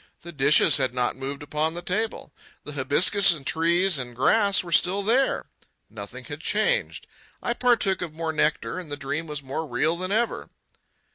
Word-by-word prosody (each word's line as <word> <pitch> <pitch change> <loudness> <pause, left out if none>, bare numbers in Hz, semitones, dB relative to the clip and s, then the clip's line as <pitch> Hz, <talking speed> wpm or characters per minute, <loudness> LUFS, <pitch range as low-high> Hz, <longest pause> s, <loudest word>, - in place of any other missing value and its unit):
The 170 - -8
dishes 145 +1 +4
had 130 -3 0
not 125 -1 0
moved 135 +2 -6
upon 150 +2 -2
the 175 - -7
table. 205 -4 -3 0.3
The 150 - -8
hibiscus 170 +9 +3
and 145 -4 -10
trees 170 +1 +2
and 120 -2 -7
grass 200 - +3
were 170 - -9
still 185 +4 +2
there. 250 +6 +1 0.5
Nothing - - -9
had - - -8
changed. - - 0 0.3
I 240 - -2
partook 235 -7 +1
of 175 -3 -4
more 160 +1 -3
nectar, 150 -2 0
and 170 -5 -10
the 145 - -4
dream 145 +4 -4
was 150 -2 -6
more 140 +4 -4
real 145 +6 0
than 185 +2 -4
ever. 230 +3 -1
160 Hz, 180 wpm, -24 LUFS, 140-195 Hz, 0.5 s, dishes